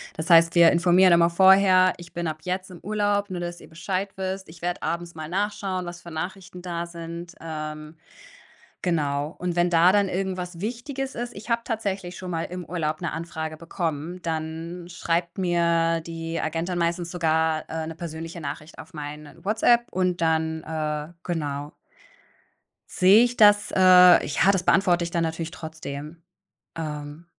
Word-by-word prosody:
Das 160 +3 -5
heißt, 165 0 +6
wir 170 -1 +7
informieren 180 +1 +5
immer 170 0 +5
vorher: 190 +1 +6
„Ich 175 -1 -13
bin 170 -1 -3
ab 155 0 -4
jetzt 185 +2 -3
im 175 - -11
Urlaub, 205 0 0
nur 180 -1 -4
dass 175 0 -5
ihr - - -14
Bescheid 185 +4 -3
wisst. 190 -1 -4
Ich 160 0 -14
werde 175 +1 -2
abends 170 0 -3
mal 155 -1 -7
nachschauen, 190 -1 -2
was 175 0 -8
für 170 - -11
Nachrichten 180 +2 -6
da 170 -1 -4
sind.“ 170 0 -8
Ähm, 155 -1 -6 0.9
genau. 150 -3 -1
Und 175 -1 -3
wenn 175 0 +3
da 170 +2 +5
dann 200 -1 +3
irgendwas 185 -2 -3
Wichtiges 260 +5 -4
ist 240 0 -5
ich 210 +4 -10
habe 235 0 +1
tatsächlich 195 -6 -3
schon 185 -1 -6
mal 165 -1 -2
im 180 0 -6
Urlaub 155 -2 -2
'ne 170 - -3
Anfrage 160 -1 -5
bekommen, 165 +1 -4
dann 165 +2 -4
schreibt 170 0 -2
mir 170 -2 +2
die 165 0 -4
Agentin 165 +3 -2
meistens 170 0 -1
sogar, 160 -2 +1
äh, 160 0 -3
'ne 165 - -6
persönliche 165 +1 -7
Nachricht 150 +2 -7
auf - - -11
meine 150 0 -8
WhatsApp 230 +3 +3
und 180 -1 0
dann 160 -1 0
äh, 155 0 -3
genau 145 -4 -4 1.2
sehe 195 +5 +6
ich 245 0 -1
das. 205 -1 +5
Äh, - - 0 0.5
ja, 165 +7 +3
das 190 -2 0
beantworte 180 -2 +3
ich 170 - -4
da 170 - 0
natürlich 165 0 -3
trotzdem, 155 -1 -8 0.6
ähm 150 0 -6
170 Hz, 165 wpm, -25 LUFS, 160-185 Hz, 1.2 s, wir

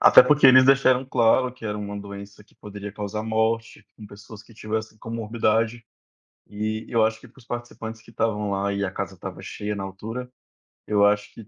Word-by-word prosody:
Até - - +9
porque 145 +2 +5
eles 130 0 +8
deixaram 135 -1 +4
claro 125 0 +3
que 125 -3 -14
era 105 -1 -3
uma 100 0 -5
doença 100 0 -10
que - - -28
poderia 105 -1 -8
causar 105 0 -4
morte 110 +1 -1
com 105 - -11
pessoas 100 +2 -12
que 115 - -19
tivessem 110 0 -5
comorbidade. 115 0 -1 0.6
E 110 +1 -3
eu 115 -2 +3
acho 110 0 -1
que 130 - -14
para 125 - -23
os - - -19
participantes 115 -2 -6
que 115 - -17
estavam 105 -2 -1
lá, 100 0 -1
e 100 0 -1
a 95 - -2
casa - - -5
estava - - -8
cheia 105 0 -4
na 100 - -4
altura, 110 +6 -6 0.6
eu 105 -1 +4
acho 105 0 +1
que 110 -3 -12
110 Hz, 200 wpm, -24 LUFS, 105-115 Hz, 0.6 s, Até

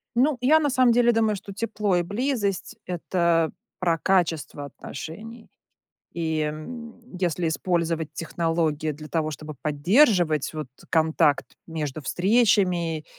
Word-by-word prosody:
Ну, 265 +3 +3
я 300 +5 +5
на 295 -2 +1
самом 255 -2 +4
деле 240 0 +4
думаю, 220 -2 +2
что 200 0 -9
тепло 210 -2 -1
и 175 - +3
близость- 205 -1 -2
это 170 -2 +1 0.3
про 170 -3 +1
качество 165 -5 0
отношений. 215 - -9 0.6
И, 160 -2 -1
м, 230 +9 -6
если 175 -2 0
использовать 165 -1 -1
технологии 165 -2 -1
для 150 +1 -10
того, 155 -2 -1
чтобы 155 +1 -7
поддерживать 170 - +3
вот 155 -3 -5 0.2
контакт 160 -3 +2 0.2
между 155 -3 -4
встречами 180 - +2
175 Hz, 125 wpm, -25 LUFS, 155-220 Hz, 0.6 s, я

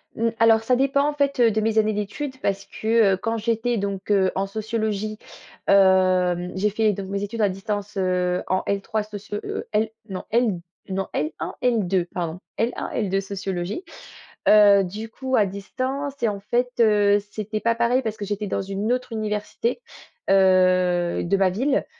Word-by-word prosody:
Mmh, 230 +1 +1
alors 225 -1 +5
ça 250 +2 +2
dépend 275 +2 +2
en 295 - 0
fait, 280 -2 0
heu, 230 -2 +5
de 220 - 0
mes 220 0 0
années 215 0 +3
d'études 260 +7 -4
parce 200 0 -1
que, 220 -3 +2
heu, - - 0
quand 225 +4 -2
j'étais 230 +1 0
donc, 195 -1 -4
heu, 190 -2 +3
en 195 +1 -1
sociologie, 215 0 -3 0.5
hem, 185 -2 +4
j'ai 200 +3 +1
fait 215 +1 +1
donc 195 0 -6
mes 200 +1 -3
études 220 +3 -4
à 205 - +4
distance, 200 +1 -4
heu, 180 -1 0
en 185 0 +1
L3 210 +2 -1
socio 205 0 -6
heu - - -5
L 215 +1 +2 0.2
non, 185 -1 -5
L 225 -5 +2 0.3
non 195 0 -2
L1-L2 190 +3 -1
pardon, 170 -1 -3 0.2
L1-L2 215 -4 -1
sociologie. 195 - -4 0.7
Heu, 205 -2 +7
du 210 +5 -6
coup 260 +3 -2
à 210 - +4
distance 260 +8 -4
et 230 - +4
en 200 -1 -4
fait, 245 +4 0
heu, 205 -2 +4
c'était 215 0 -4
pas 230 0 +2
pareil 235 +2 +2
parce 220 -2 -3
que 205 - -5
j'étais 205 +1 -3
dans - - -1
une 195 +4 -1
autre 250 0 -3
université, 215 - -2 0.5
heu, 185 -2 +3
de 195 +3 +1
ma 195 -1 +3
ville 265 +9 0
210 Hz, 175 wpm, -23 LUFS, 195-225 Hz, 0.7 s, Heu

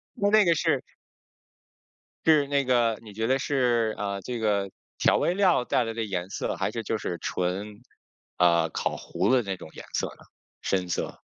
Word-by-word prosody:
那 205 +1 +4
个 170 -1 +4
是 - - +1 1.4
是 155 -3 +5
那 140 -1 +1
个 120 -3 +2
你 105 - -11
觉 110 +2 -1
得 130 +2 +3
是， 120 -5 +1
啊， 100 -1 -2
这 120 +2 -4
个 100 -3 0 0.3
调 - - +4
味 175 - +1
料 185 -9 +3
带 125 - +1
来 115 -1 -4
的 115 0 -2
颜 95 -4 -3
色， - - -2
还 - - -1
是 115 - -3
就 110 0 -2
是 90 -4 -4
纯， 100 +4 -3 0.6
啊， 85 -2 +4
烤 - - -2
糊 - - -2
了 130 0 +4
的 100 -4 -5
那 95 - -2
种 80 - -10
颜 - - -9
色 - - 0
呢？ - - -13 0.4
深 95 -2 0
色。 85 - -3
115 Hz, 200 characters per minute, -27 LUFS, 100-130 Hz, 1.4 s, 是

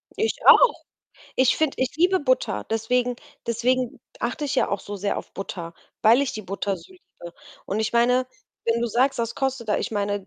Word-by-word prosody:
Ich 445 +1 0
auch. - - +8 0.6
Ich 260 -1 +3
finde 310 -3 +1
ich 260 +2 -1
liebe 365 +3 +3
Butter, 255 -3 0
deswegen 245 +2 0 0.3
deswegen 245 +2 0 0.2
achte 300 - -2
ich 275 - -2
ja - - +2
auch 200 - -1
so 205 - -7
sehr 200 +1 -2
auf - - -8
Butter, 175 -3 -6 0.3
weil 230 +5 +6
ich 280 - -2
die 215 - -5
Butter 195 0 -3
so 375 - -16
liebe. 175 - -13 0.3
Und 205 +3 -2
ich 220 +1 -1
meine, 250 +2 +3 0.4
wenn 230 0 +2
du 240 - +1
sagst, 260 +4 +1
das 230 0 -1
kostet 265 -4 -2
da 210 - +2
ich - - -3
meine 205 -1 -1
235 Hz, 200 wpm, -24 LUFS, 205-265 Hz, 0.6 s, auch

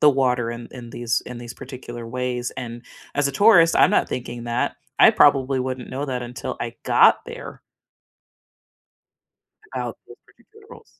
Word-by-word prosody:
the 150 - +7
water 125 -4 +1
in 120 0 -7
in 120 -2 -10
these 115 -1 -1
in 125 - -7
these 120 -1 -9
particular 120 -3 -9
ways, 125 0 -3
and 120 -1 -6 0.3
as 145 0 +2
a - - -5
tourist, 170 -2 +6
I'm - - +6
not - - +2
thinking 120 -1 -5
that, 120 +1 -1 0.2
I - - +8
probably 135 -2 +4
wouldn't 130 -1 -4
know 135 +3 -3
that 125 -2 -3
until 120 0 -6
I - - -4
got - - +5
there - - -9 2.1
about 125 -2 -4
those 120 - -13
particular 430 - -22
rules. 460 - -16
125 Hz, 165 wpm, -22 LUFS, 120-135 Hz, 2.1 s, I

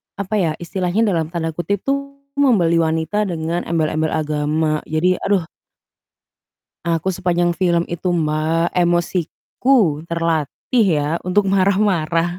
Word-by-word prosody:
apa 200 +2 -3
ya, 165 -4 +1
istilahnya 180 +4 -1
dalam 165 -3 0
tanda 165 -1 -2
kutip 185 +4 -2
tuh 280 0 -2 0.2
"Membeli 180 -12 +3
wanita 160 +6 0
dengan 170 0 -2
embel-embel 155 -1 0
agama." 155 0 0
Jadi 175 +4 +1
aduh 190 -5 0 1.4
aku 170 +1 -1
sepanjang 175 -2 +1
film 170 -2 +2
itu, 180 +2 -4
Mbak, 160 0 0
emosiku 175 - -1 0.4
terlatih 170 - 0
ya - - +1 0.3
untuk 200 +3 +3
marah-marah 185 -4 +2
170 Hz, 115 wpm, -19 LUFS, 160-190 Hz, 1.4 s, Membeli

